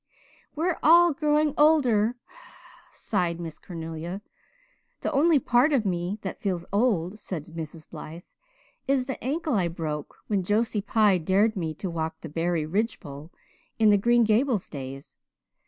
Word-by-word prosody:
"We're 335 +3 0
all 340 +1 +6
growing 300 0 +1
older," 250 -8 +4 0.8
sighed 175 -5 -2
Miss 165 -3 -7
Cornelia. 165 +2 -6 0.8
"The - - -1
only 310 +3 +4
part 255 +3 +3
of 245 -6 +2
me 180 +1 -1
that 190 - -6
feels 180 -4 -2
old," 205 -3 +1
said 175 -7 -5
Mrs. 160 -1 -7
Blythe, 165 +3 -9 0.6
"is 270 -2 +2
the 265 -1 -6
ankle 300 +3 -1
I 190 -6 +2
broke 155 -3 -5
when 205 -3 0
Josie 210 +3 0
Pye 210 -3 +3
dared 200 +7 +2
me 160 -5 -3
to 190 - -5
walk 160 -2 -4
the 160 - -7
Barry 165 +1 -1
ridge 210 +8 -1
pole 145 +2 -10 0.5
in 220 -2 +5
the 205 - +5
Green 240 +3 +4
Gables 225 0 +1
days. 135 -1 -8
200 Hz, 150 wpm, -26 LUFS, 165-245 Hz, 0.8 s, all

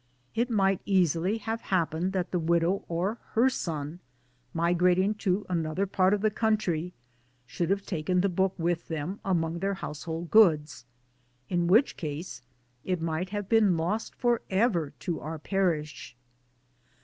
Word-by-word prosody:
It 235 +2 0
might 195 -4 +2
easily 185 +1 +2
have 225 +1 -4
happened 175 -1 0
that 185 -1 -2
the 180 - 0
widow 170 +3 +1
or 185 +7 -2
her 250 +4 +4
son, 155 - -4 0.5
migrating 180 +4 +2
to 195 0 0
another 170 +1 -1
part 185 -1 +2
of 205 - -4
the 215 0 +2
country, 195 -6 0 0.5
should 170 +6 -3
have 195 0 0
taken 180 0 0
the 200 - +2
book 190 +1 0
with 170 0 -1
them 160 +5 -4
among] 170 -3 0
their 195 +2 -1
household 165 -1 -6
goods 155 - +4 0.6
in 175 -1 +1
which' 220 +10 +4
case 150 -3 -5 0.4
it 185 -2 -1
might 165 +2 -2
have 205 -1 -4
been 210 -5 +4
lost 180 +8 -2
for 240 -2 +1
ever 190 - +1
to 175 -3 -2
our 160 +1 -5
Parish. 155 -7 -2
180 Hz, 150 wpm, -28 LUFS, 165-200 Hz, 0.6 s, her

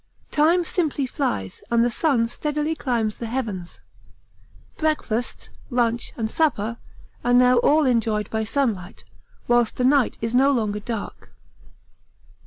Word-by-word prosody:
Time 335 +4 +3
simply 310 -5 -1
flies 175 - -3
and 235 0 +3
the - - +2
sun 245 -3 +2
steadily 300 +5 -2
climbs 235 -8 -1
the 235 - -5
heavens. 215 -8 -4 1.0
Breakfast, 300 -7 -2 0.2
lunch, 240 -2 0
and 225 - -1
supper 230 -5 0 0.5
are 245 - +2
now 250 0 +5
all 300 +5 +4
enjoyed 225 -4 +1
by 220 0 -1
sunlight, 215 -6 -2 0.4
whilst 240 -2 +2
the 250 - -1
night 275 -1 +3
is 230 +1 -3
no 265 +3 +5
longer 215 -6 0
dark. 220 0 -6
240 Hz, 130 wpm, -23 LUFS, 220-280 Hz, 1.0 s, now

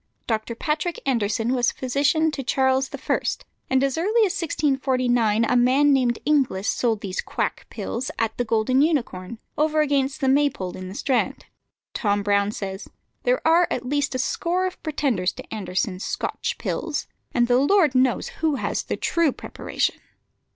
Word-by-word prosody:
Dr. 225 0 -2
Patrick 305 +6 -2
Anderson 230 -1 0
was 245 -1 +2
physician 290 +5 +1
to 290 - -4
Charles 265 +1 +1
I., - - -1 0.5
and 265 0 +3
as 275 +3 0
early 430 +6 +3
as 375 - -1
1649 255 - +1
a 245 - +1
man 265 +4 +4
named 245 -3 +2
Inglis 265 -10 +1
sold 225 -4 +1
these 190 -3 -3
quack - - -3
pills 245 +3 -4
at 225 -1 -1
the 245 - 0
Golden 230 +3 +2
Unicorn, 235 - -1 0.2
over 310 0 +3
against 280 -1 +1
the 270 - 0
Maypole 270 -10 +1
in 185 0 -7
the 190 - -8
Strand. 260 +2 -1 0.5
Tom 205 -1 0
Brown 200 0 +2
says, 195 -1 -6 0.4
"There - - +1
are 335 +2 +5
at 250 - -3
least 285 +1 0
a - - +1
score 345 +8 0
of 370 - -5
pretenders 270 - 0
to - - -10
Anderson's 185 -1 -2
Scotch - - -2
pills, 315 -3 -3 0.3
and 240 -1 +2
the 245 +1 +4
Lord 310 0 +4
knows 255 -1 +2
who 315 -2 +1
has - - -1
the - - -4
true 335 -4 +2
preparation." - - -3
260 Hz, 165 wpm, -24 LUFS, 225-300 Hz, 0.5 s, are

